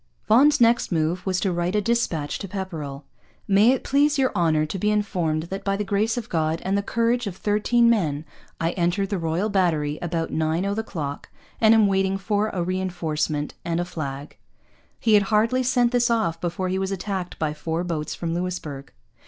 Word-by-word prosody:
Vaughan's 285 +7 +5
next 235 -2 +3
move 165 +2 0
was 185 -1 +1
to 190 - 0
write 175 +2 -1
a - - +4
dispatch 205 -10 -1
to 195 - -5
Pepperrell: 165 -8 -5 0.4
'May 205 +3 +5
it 265 - -1
please 290 +2 +2
your 265 -1 +2
Honour 160 -4 +2
to 185 +5 -5
be 210 - +1
informed 180 -7 0
that 195 +4 -6
by 195 0 0
the 210 - -1
Grace 210 +3 0
of 235 -2 -4
God 160 -2 0
and 190 +1 +1
the 200 - +2
courage 230 +2 0
of 185 -2 -6
13 215 +4 +2
Men 160 -10 +1 0.3
I 165 +1 0
entered 180 +3 0
the 200 - 0
Royal 165 +5 -1
Battery 165 -7 0
about 165 -1 -2
9 160 +3 0
o' 200 - 0
the 220 - -1
clock 150 -9 -6 0.3
and 220 0 +6
am 220 -2 +5
waiting 195 -1 +1
for 205 +2 0
a 180 -4 -2
reinforcement 165 -5 -2
and 170 0 -1
a 175 - -1
flag.' 140 -4 -6 0.6
He 225 - +2
had 205 - +7
hardly 225 +4 +2
sent 245 -1 +2
this 245 -1 +2
off 170 -8 0
before 180 +2 -2
he 190 +1 -1
was 190 0 -2
attacked 190 -1 -4
by 155 -2 -1
four 160 +3 -3
boats 160 -4 -3
from 165 -1 -3
Louisbourg. 170 -6 -4
185 Hz, 200 wpm, -24 LUFS, 165-210 Hz, 0.6 s, had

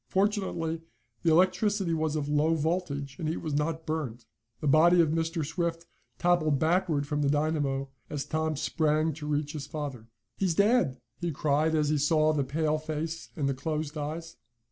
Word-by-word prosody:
Fortunately 190 -5 0 0.4
the 170 - +2
electricity 185 +2 +3
was 155 -1 0
of 150 -2 -1
low 150 +2 +2
voltage, 150 -4 -2
and 155 - -1
he 160 - -1
was 155 -3 -4
not 160 +2 -1
burned. 135 -7 -3 0.3
The - - -5
body 165 +5 +6
of 165 -3 +5
Mr. 165 0 -1
Swift 165 +1 -2 0.3
toppled 175 -5 +3
backward 160 -2 +1
from 150 0 -1
the 140 - +2
dynamo, 145 -2 0 0.2
as 145 -2 -3
Tom 155 0 -1
sprang 155 +1 +1
to 150 0 -7
reach 150 0 -1
his 145 -2 -5
father. 145 -7 -5 0.3
"He's 185 -4 +1
dead!" 205 - +3 0.2
he 175 -1 -1
cried, 150 +2 +1
as 150 -1 +2
he 150 -1 +2
saw 155 +1 +3
the 145 -2 +1
pale 155 +3 0
face 155 +1 -4
and 145 -4 0
the 135 - +1
closed 150 +2 -3
eyes. 160 +2 -5
155 Hz, 175 wpm, -29 LUFS, 145-165 Hz, 0.4 s, body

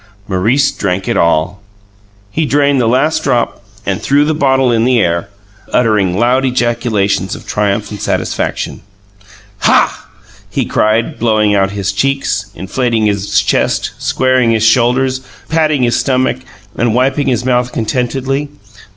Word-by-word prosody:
Maurice 110 +9 +2
drank 95 -1 -2
it - - 0
all! 85 +4 +1 0.7
He 160 +4 -1
drained 140 -2 +2
the 115 - +1
last 135 +7 +1
drop 120 -4 -1 0.2
and - - -2
threw 145 +2 +2
the 155 - +1
bottle 135 -4 +2
in 115 -1 +2
the 125 0 +3
air, 85 -3 0 0.4
uttering 105 -6 +2
loud 125 +4 +2
ejaculations 115 -6 0
of - - -11
triumph 105 0 -1
and 105 - -7
satisfaction. - - -2 0.8
"Hah!" - - +2 0.4
he - - -1
cried, 110 +2 0
blowing 110 -2 +2
out 95 -1 +2
his 100 -2 -2
cheeks, 105 -3 -1
inflating 110 +5 -1
his 100 -1 +1
chest, - - 0
squaring 130 -2 +1
his 110 -1 +1
shoulders, 130 +3 +2 0.3
patting 155 -4 +1
his 120 -1 +2
stomach, 130 -1 +1 0.4
and 120 -1 0
wiping 135 +3 +1
his 125 -2 0
mouth 125 -1 +1
contentedly. 135 +4 -2
120 Hz, 140 wpm, -14 LUFS, 105-130 Hz, 0.8 s, the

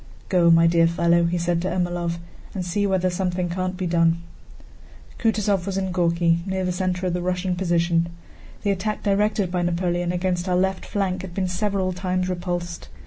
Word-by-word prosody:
"Go, 175 -3 +4
my 165 0 +6
dear 165 0 +4
fellow," 170 0 +3
he 170 +1 0
said 170 0 0
to 185 - -1
Ermólov, 175 -2 -1 0.4
"and 185 -2 -2
see 200 +3 0
whether 185 -1 +1
something 180 -1 -1
can't 185 +1 -2
be 185 - -2
done." 165 -1 +3 1.0
Kutúzov 205 -5 +1
was 195 -1 -2
in 190 -1 -1
Górki, 170 -1 +2
near 190 -1 -1
the 180 - 0
center 185 0 -1
of 180 - 0
the 180 - -1
Russian 180 0 -1
position. 170 -2 +1 0.5
The 205 - +2
attack 210 +2 -2
directed 205 -2 +1
by 180 -1 0
Napoleon 175 0 0
against 180 0 -1
our 180 - +2
left 190 +1 0
flank 190 -3 -1
had 185 -2 -8
been 190 -2 0
several 190 0 -1
times 185 0 -1
repulsed. 175 -1 -4
180 Hz, 185 wpm, -23 LUFS, 175-190 Hz, 1.0 s, my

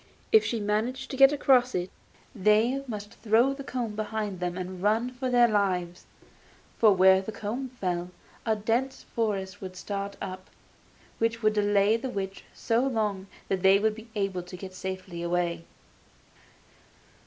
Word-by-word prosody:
If 440 -1 +7
she 230 - -1
managed 225 +6 -2
to - - -4
get 270 +1 +7
across 255 -3 +3
it, 180 0 -2 0.4
they 220 +5 +2
must 210 -2 -6
throw 235 +5 +3
the 275 0 -8
comb 245 -5 -3
behind 215 -3 -3
them 180 0 -3
and 185 0 -6
run 220 +5 +1
for 255 +1 -3
their 245 -1 +5
lives, 185 -5 -1 0.7
for 220 -2 +7
where 190 +1 +6
the 195 - -6
comb 225 +5 -4
fell 180 -1 -2 0.3
a 220 -1 +1
dense 235 +5 -1
forest 205 -4 -3
would 185 -1 -7
start 200 +1 -4
up, 185 -1 -7 0.7
which 230 0 0
would 215 0 +4
delay 205 +1 +3
the 260 +3 -5
witch 195 -3 -5
so 230 0 0
long 215 -7 -1 0.2
that 190 -1 -1
they 190 +1 +6
would 215 +1 +1
be 220 +2 -11
able 195 -3 -1
to 180 +1 -10
get 185 0 -8
safely 185 -2 -6
away. 170 -1 -1
210 Hz, 160 wpm, -27 LUFS, 190-235 Hz, 0.7 s, If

